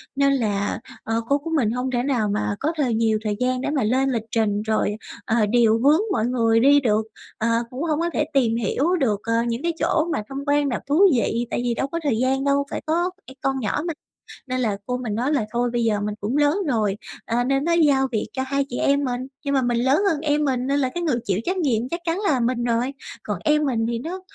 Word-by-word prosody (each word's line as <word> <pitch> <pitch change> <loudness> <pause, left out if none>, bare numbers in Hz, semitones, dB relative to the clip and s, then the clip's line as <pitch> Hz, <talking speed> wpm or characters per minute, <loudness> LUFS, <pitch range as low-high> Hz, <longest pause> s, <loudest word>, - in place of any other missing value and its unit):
Nên 275 0 +3
là, 205 -6 -1 0.2
ờ, 225 +1 -1
cô 280 - +4
của 325 +3 -7
mình 225 -7 +1
hông 250 +2 -2
thể 245 -1 0
nào 245 -7 0
mà 205 0 -1
có 305 - 0
thời 260 -6 +1
nhiều 220 -1 +1
thời 210 -2 -1
gian 255 0 0
để - - -2
mà 285 -4 0
lên 260 +5 +2
lịch 230 -4 -1
trình, 210 -2 +1
rồi, 215 -1 0 0.3
ờ, 225 - 0
điều 230 -1 +4
hướng 295 - +4
mọi 220 - +1
người 230 -2 +2
đi 285 +3 +6
được, 220 -5 +2 0.4
ờ, 225 - -1 0.2
cũng 255 +5 -5
hông 310 -2 0
có 340 +1 0
thể 300 - +1
tìm 240 -5 +2
hiểu 270 - +1
được, 215 -8 +1
ờ, 230 - -1
những 235 +3 -3
cái 340 0 0
chỗ 315 - +2
mà - - -2
tham 275 +1 -5
quan 285 0 +2
nào 245 - -2
thú 300 +6 +3
vị, 235 +1 0
tại - - -1
vì 240 -1 0
đâu 270 - -2
có 335 +4 -3
thời 275 -7 +1
gian 265 +3 +1
đâu, 280 0 +2
phải - - -3
có 345 +3 +1 0.2
phải 265 - -11
con 270 0 0
nhỏ 240 +6 -1
mà. 330 - -1 0.5
Nên 255 0 -2
là 215 -5 0
cô 250 +2 -2
mình 235 -5 -4
nói 255 +6 0
là 255 -7 +1
thôi 240 +1 0
bây 240 -1 +1
giờ 215 -2 +1
mình 210 0 -3
cũng 230 +8 -1
lớn 295 +4 +3
rồi, 215 -6 0 0.3
ờ, 240 +1 0
nên 270 +2 +1
nói 340 +1 +2
giao 270 -2 +3
việc 220 - -1
cho 260 - -2
hai 275 +1 -1
chị 245 - -4
em 280 +1 +2
mình. 250 -2 -2 0.2
Nhưng 280 - 0
mà 270 - +3
mình 240 -1 0
lớn 265 +8 +3
hơn 310 - 0
em 300 -1 +1
mình, 255 -2 0
nên 280 +1 +1
là 260 -2 +1
cái 345 +6 -4
người 280 -8 +1
chịu 195 -1 0
trách 370 +1 -1
nhiệm 250 -8 0
chắc 340 - -3
chắn 330 +1 0
là 380 -11 +1
mình 240 0 0
rồi, 240 +3 0 0.3
còn - - -3
em 300 0 +3
mình 230 -4 0
thì 235 -1 -2
nó 350 +8 -6
255 Hz, 260 wpm, -23 LUFS, 230-285 Hz, 0.5 s, đi